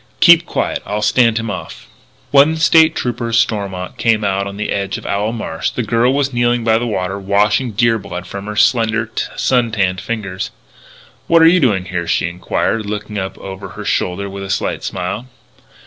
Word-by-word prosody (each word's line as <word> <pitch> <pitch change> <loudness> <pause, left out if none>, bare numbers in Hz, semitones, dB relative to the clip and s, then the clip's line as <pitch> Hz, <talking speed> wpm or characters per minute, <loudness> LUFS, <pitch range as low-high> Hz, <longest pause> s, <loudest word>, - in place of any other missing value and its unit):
Keep 170 -1 +6
quiet. - - -2
I'll 105 +1 -3
stand 115 +1 +3
him 115 -2 -2
off." - - -7
IV - - -22 0.5
When 145 +3 +6
State 160 0 +5
Trooper 120 -1 -2
Stormont 100 -5 -1
came 110 -2 +2
out 100 0 0
on 100 0 -7
the 105 - -3
edge 100 +1 -2
of 115 - -11
Owl 105 +2 -1
Marsh, 110 -8 -3
the 125 - -3
girl 115 +3 +2
was 140 -1 0
kneeling 120 0 +1
by 110 0 +3
the 120 - -2
water, 95 -2 -2
washing 105 +5 +1
deer 115 +2 +2
blood 90 -3 -7
from 100 +2 -7
her 105 - -5
slender, 110 +1 +2 0.2
sun 125 -3 +1
tanned 95 -3 0
fingers. 100 -3 -4 0.8
"What 165 -1 +5
are - - +8
you 180 +2 +5
doing 105 - +1
here?" 85 -2 -4
she 80 - +1
enquired, 100 +5 -2
looking 105 0 -4
up 95 0 -5
over 95 0 -8
her - - -6
shoulder 95 +3 -1
with 100 0 -7
a 95 - -7
slight 95 - -2
smile. 95 +6 -4
105 Hz, 195 wpm, -17 LUFS, 100-120 Hz, 0.8 s, are